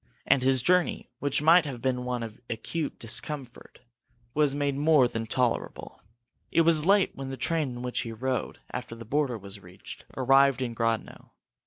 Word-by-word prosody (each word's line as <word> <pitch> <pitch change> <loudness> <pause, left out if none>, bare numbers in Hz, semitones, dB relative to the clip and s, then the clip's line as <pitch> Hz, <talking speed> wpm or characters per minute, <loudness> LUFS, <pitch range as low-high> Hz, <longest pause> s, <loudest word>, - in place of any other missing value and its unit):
And 135 - +4
his 130 -1 +2
journey, 180 +3 +1
which 145 +1 0
might 165 +3 +7
have 135 -5 -5
been 125 +1 -1
one 125 -1 -2
of 110 0 -9
acute 150 +7 -3
discomfort, 125 +3 -3 0.5
was 145 -1 +2
made 145 -1 0
more 145 -2 +4
than 115 -1 -4
tolerable. 125 0 -2 0.5
It 165 - +4
was 165 -1 +3
late 200 0 +4
when 135 -1 -6
the 135 - -5
train 155 +2 0
in 120 -1 -7
which 125 -1 -2
he 115 - -4
rode 130 +3 -3
after 115 -2 -6
the 115 0 -10
border 135 -1 0
was 100 -1 -8
reached - - -12
arrived 135 0 +4
in 120 -2 -3
Grodno. 115 -1 -3
130 Hz, 175 wpm, -27 LUFS, 120-150 Hz, 0.5 s, might